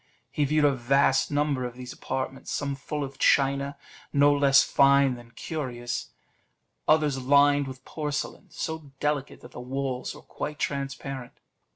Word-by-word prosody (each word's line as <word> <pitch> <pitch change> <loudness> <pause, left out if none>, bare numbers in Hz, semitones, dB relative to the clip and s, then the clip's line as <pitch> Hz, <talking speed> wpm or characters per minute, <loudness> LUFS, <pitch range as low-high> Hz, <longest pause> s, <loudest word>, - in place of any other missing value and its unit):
He 145 - +1
viewed 150 +1 +3
a 145 - +4
vast 135 +2 +2
number 145 -3 0
of 125 -1 -5
these 125 0 -8
apartments, 130 0 -4
some 140 -1 -1
full 145 +2 -4
of 135 0 -8
china, 140 0 +2 0.3
no 145 0 +5
less 140 -1 +5
fine 140 -1 +4
than 120 -1 -11
curious; 120 -2 -4 0.8
others 150 -4 +3
lined 145 +1 +4
with 130 -1 -9
porcelain, 150 -2 -4
so 160 -3 -5
delicate, 145 -2 -2
that 120 - -13
the - - -9
walls 130 0 -3
were - - -13
quite 150 0 -6
transparent. 135 -3 -4
140 Hz, 150 wpm, -27 LUFS, 130-145 Hz, 0.8 s, no